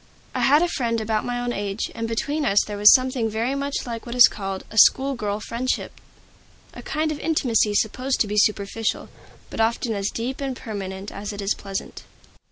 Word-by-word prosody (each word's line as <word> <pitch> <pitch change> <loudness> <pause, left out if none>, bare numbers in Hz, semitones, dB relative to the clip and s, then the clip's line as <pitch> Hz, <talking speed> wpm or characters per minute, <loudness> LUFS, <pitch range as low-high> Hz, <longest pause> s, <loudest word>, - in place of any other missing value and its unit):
I - - -2
had 295 +5 +4
a - - +2
friend 235 -8 -1
about 220 0 -1
my 245 0 -2
own 245 0 -2
age, 200 0 -3
and 230 0 -4
between 285 +7 -2
us 205 -7 +3
there 210 - -6
was 205 +1 +8
something 255 -3 +2
very 225 +5 -1
much 280 0 -3
like 230 -2 -5
what 235 - -5
is 250 - +9
called 195 -2 -5
a 220 - -8
"school 275 +5 +5
girl 210 -4 -3
friendship," 235 +4 -3 0.7
a - - -9
kind 310 0 -2
of 300 - -5
intimacy 235 -9 +1
supposed 255 +6 0
to 215 - +2
be 210 +1 -3
superficial, 210 +2 0 0.4
but - - -2
often 225 +1 0
as 200 -1 -1
deep 255 +4 -4
and 270 -2 -3
permanent 195 -3 -6
as 205 +1 -6
it 205 - -8
is 200 +1 0
pleasant. 195 -1 -6
225 Hz, 200 wpm, -23 LUFS, 205-255 Hz, 0.7 s, is